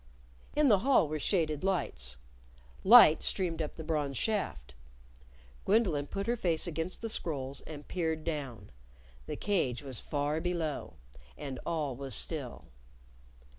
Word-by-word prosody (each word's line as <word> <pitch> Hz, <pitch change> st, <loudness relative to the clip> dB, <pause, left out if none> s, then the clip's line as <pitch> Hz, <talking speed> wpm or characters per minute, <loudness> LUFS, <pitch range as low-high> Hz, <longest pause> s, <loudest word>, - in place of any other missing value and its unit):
In 300 Hz, -1 st, +4 dB
the 210 Hz, -6 st, +5 dB
hall 255 Hz, -, +4 dB
were 155 Hz, +1 st, -3 dB
shaded 155 Hz, -3 st, 0 dB
lights. 65 Hz, -, -2 dB, 0.7 s
Light 205 Hz, -7 st, +9 dB
streamed 170 Hz, -4 st, 0 dB
up 150 Hz, -, -4 dB
the 160 Hz, -, -7 dB
bronze 150 Hz, -4 st, -1 dB
shaft. 75 Hz, -, -2 dB, 0.9 s
Gwendolyn 185 Hz, -9 st, +2 dB
put 195 Hz, +5 st, -4 dB
her 240 Hz, -, +1 dB
face 170 Hz, -8 st, 0 dB
against 170 Hz, +4 st, -4 dB
the -, -, -1 dB
scrolls 140 Hz, -10 st, -2 dB
and 150 Hz, -2 st, -9 dB
peered 160 Hz, -3 st, -2 dB
down. 135 Hz, -, -5 dB, 0.6 s
The 150 Hz, -, -3 dB
cage 155 Hz, -, 0 dB
was 130 Hz, -5 st, -5 dB
far 145 Hz, +2 st, -2 dB
below. 170 Hz, -4 st, -3 dB, 0.4 s
And 135 Hz, -3 st, -6 dB
all 150 Hz, -6 st, -1 dB
was 135 Hz, +1 st, -2 dB
still. 145 Hz, -7 st, -3 dB
155 Hz, 135 wpm, -31 LUFS, 140-185 Hz, 0.9 s, Light